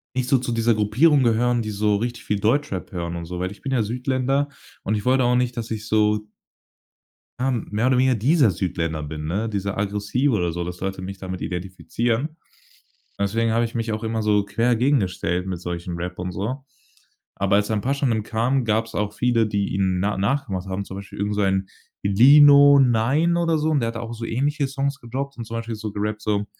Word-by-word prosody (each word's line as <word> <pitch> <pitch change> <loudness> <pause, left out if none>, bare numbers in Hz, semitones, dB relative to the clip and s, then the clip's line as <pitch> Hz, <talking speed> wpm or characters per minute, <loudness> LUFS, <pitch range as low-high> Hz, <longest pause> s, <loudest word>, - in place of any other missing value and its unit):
nicht 130 -1 -1
so 135 - +4
zu 125 0 -3
dieser 115 0 +2
Gruppierung 120 +9 +3
gehören, 120 +1 +2
die 110 - -4
so 105 0 +1
richtig 120 +3 -4
viel 105 - -1
Deutschrap 110 -3 0
hören 85 -2 -4
und 85 -1 -5
so, 90 +1 -6
weil 90 +1 -2
ich 100 - -13
bin 135 - -4
ja 125 -4 +2
Südländer 130 +4 -1 0.3
und 110 - 0
ich 105 - -4
wollte 130 +1 +3
auch 125 0 +3
nicht, 125 -1 0
dass 115 -1 -5
ich 110 -1 -5
so 105 0 +1 1.1
ja, 130 +1 +1
mehr 115 -1 -1
oder 130 -1 +3
weniger 130 0 +3
dieser 130 - +3
Südländer 85 -3 -2
bin, 75 +1 -6
ne, 100 +8 -1
dieser 100 -2 -3
aggressive 105 +7 0
oder 90 -4 0
so, 85 +1 -4
dass 90 0 -7
Leute 95 0 -3
mich 95 +1 -7
damit 95 -1 -6
identifizieren. 115 - -2 0.8
Deswegen 110 +3 0
habe 115 +1 +2
ich 115 - -5
mich 115 -1 -2
auch 110 +1 -4
immer 110 0 -1
so 105 -1 +2
quer 115 +4 +1
gegengestellt 95 -8 0
mit 90 -3 -4
solchen 85 0 -5
Rap 90 +1 -5
und 90 0 -3
so. 115 +9 -4 0.7
Aber 100 +1 +1
als 105 0 +2
dann 110 -2 0
„Pashanim“ 130 -3 0
kam, 120 +5 0
gab's 110 0 -1
auch 105 0 -1
viele, 115 -1 +2
die 100 -2 -1
ihn 95 -1 +1
na 105 +2 0
nachgemacht 100 -3 -1
haben, 95 +1 -3
zum 95 - -9
Beispiel 100 0 -10
irgend 105 +1 -1
so 105 - -1
ein 95 -1 +1 0.4
„Lino 140 +7 +7
Nine“ 135 +7 +3
oder 165 -2 +1
so 155 +1 0
und 150 -3 +2
der 115 - 0
hat 115 - -5
auch 115 0 -5
so 115 0 -6
ähnliche 140 +4 -1
Songs 140 0 -2
gedropped 135 +4 -5
und 115 - -6
zum 115 +1 -6
Beispiel 115 0 -4
so 110 -1 -6
gerappt 105 +1 -3
so 105 -1 0
110 Hz, 210 wpm, -23 LUFS, 100-125 Hz, 1.1 s, Lino